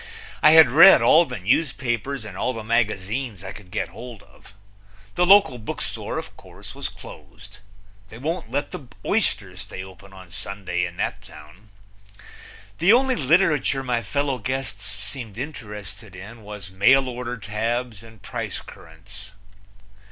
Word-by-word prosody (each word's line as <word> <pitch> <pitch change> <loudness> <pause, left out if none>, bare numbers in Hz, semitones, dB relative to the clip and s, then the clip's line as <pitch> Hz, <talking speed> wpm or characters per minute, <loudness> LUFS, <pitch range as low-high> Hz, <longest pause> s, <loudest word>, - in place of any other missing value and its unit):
I 155 - +7
had 160 -6 +8
read 165 +8 +9
all 170 +2 +6
the 125 -4 -6
newspapers 125 - -1
and 105 -4 -8
all 125 +6 -1
the 115 -2 -6
magazines 110 -1 -1
I - - -6
could 100 -4 -12
get 90 - -3
hold 115 +4 -10
of. - - -19 0.6
The 180 0 +2
local 195 -10 +6
bookstore, 110 - -4
of - - -6
course, - - -13
was - - -4
closed. 100 +1 -13 0.5
They 110 - -11
won't 155 -2 -3
let 140 +4 -2
the 135 - -8 0.2
oysters 100 - 0
stay 95 - -7
open 95 +1 -14
on 95 -2 -14
Sunday 90 -2 -3
in 85 - -12
that - - -2
town. 75 +8 -15 1.1
The 180 - +5
only 260 +2 +4
literature 150 -3 +2
my 120 -2 0
fellow 135 +4 -1
guests 115 -4 -4
seemed 105 +2 -6
interested 105 - -8
in 105 +5 -10
was 105 -4 -9
mailorder 125 +4 +2
tabs 115 +1 -3
and 115 -3 -16
price - - -4
currents. 95 +6 -11
110 Hz, 145 wpm, -23 LUFS, 100-135 Hz, 1.1 s, read